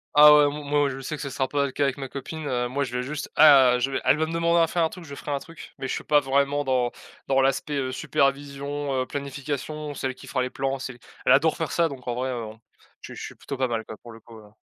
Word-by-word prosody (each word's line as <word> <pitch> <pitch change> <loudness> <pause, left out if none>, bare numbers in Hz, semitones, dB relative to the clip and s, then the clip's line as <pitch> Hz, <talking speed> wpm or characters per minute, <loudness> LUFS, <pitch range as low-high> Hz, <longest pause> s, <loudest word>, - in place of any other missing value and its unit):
Ah 150 0 +10
ouais 150 - +6
m 145 +1 -2
moi 145 0 +2
je 135 0 -6
sais 155 +4 -4
que 145 - -8
ça 140 - -4
sera 130 0 -1
pas 140 +1 0
le 135 - -4
cas 145 - -1
avec 135 0 0
ma 135 - -5
copine, 145 +3 -6
heu, 125 -1 0
moi 140 +3 -1
je 125 -2 -5
vais 125 - -1
juste 145 +3 -5
ah 135 -5 +7
je 135 +2 0
vais - - -2
elle - - +4
va 160 - +1
me 160 - -6
demander 170 0 +2
à 165 - +4
faire 170 0 0
un 160 - +2
truc, 180 +1 -10
je 140 - -9
ferai 145 - -6
un 140 - 0
truc. 165 +2 -12
Mais 135 - -4
je - - -2
suis - - -4
pas 150 - +4
vraiment 140 +2 +1
dans 130 -3 +1 0.4
dans 135 - +1
dans 135 - +5
l'aspect, 135 +2 0
heu, 130 -2 -1
supervision, 140 +1 -1
heu, - - -8
planification. 145 +2 -5
C'est 135 - -3
elle 130 - -5
qui - - -13
fera 130 - -1
les 125 - -1
plans, 135 +1 -2
c'est 125 -2 -6 0.3
elle - - +6
adore - - +3
faire - - -3
ça, 170 -1 +2
donc 130 -3 -10
en 120 - -1
vrai, 130 +2 -2
heu, 115 -3 -4 0.5
je - - -9
je - - -9
suis - - -7
plutôt 140 - -7
pas 130 0 +1
mal 115 -2 -3
quoi, 110 - -9
pour 120 - -13
le 115 - -12
coup, 115 0 -15
heu 105 -1 -16
140 Hz, 305 wpm, -25 LUFS, 130-145 Hz, 0.5 s, Ah